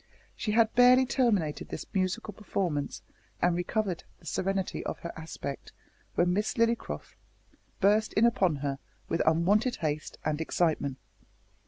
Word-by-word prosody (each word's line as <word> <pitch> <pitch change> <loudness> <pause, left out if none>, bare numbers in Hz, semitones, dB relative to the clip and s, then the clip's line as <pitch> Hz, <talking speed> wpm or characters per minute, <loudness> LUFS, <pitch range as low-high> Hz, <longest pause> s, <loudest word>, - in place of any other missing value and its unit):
She 210 - -2
had 225 0 +4
barely 250 +1 +7
terminated 210 - +1
this - - -5
musical 190 +2 -1
performance, 180 -8 -2 0.4
and 175 -1 +3
recovered 180 0 -1
the - - -21
serenity 195 0 -1
of - - -4
her 170 - -6
aspect, 160 -3 -7 0.4
when 175 +1 +3
Miss 210 +3 0
Lillycrop 230 0 0 0.8
burst 210 +2 +4
in 215 - +4
upon 190 -8 +3
her 140 -1 -2 0.3
with 165 - +1
unwonted 200 +10 +3
haste 155 -2 -3
and 155 0 0
excitement. 155 -5 0
185 Hz, 135 wpm, -29 LUFS, 160-215 Hz, 0.8 s, barely